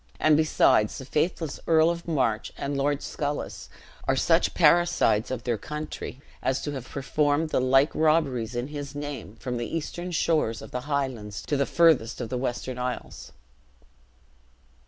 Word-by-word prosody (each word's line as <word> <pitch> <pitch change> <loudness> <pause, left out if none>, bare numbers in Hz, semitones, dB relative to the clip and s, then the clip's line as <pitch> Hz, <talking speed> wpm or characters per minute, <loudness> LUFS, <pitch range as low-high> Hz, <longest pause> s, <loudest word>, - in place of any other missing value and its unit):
And 155 -1 +5
besides, 150 -8 +3
the 130 - -7
faithless 160 +2 -1
Earl 160 0 +5
of 170 0 -6
March 125 -9 0
and 140 0 -3
Lord 140 +1 0
Sculis 145 0 -4 0.4
are - - +3
such - - +2
parricides 170 -11 +4
of 125 -3 -4
their 120 -3 -1
country, 150 0 -6 0.2
as 130 0 0
to 145 - -2
have 130 -3 -7
performed 145 +3 0
the - - +2
like 135 +3 +4
robberies, 140 -8 +1
in 120 +3 -2
his 145 -2 -6
name, 145 -7 -6
from 125 +1 -4
the 120 - -3
eastern 175 +3 -5
shores 155 -9 0
of - - -11
the 125 +2 -5
Highlands 125 -8 -2
to 145 - -1
the 140 -1 +1
furthiest 160 -9 +3
of 120 -3 -4
the 125 - -2
Western 125 0 -3
Isles." 125 0 -5
140 Hz, 160 wpm, -26 LUFS, 125-155 Hz, 0.4 s, And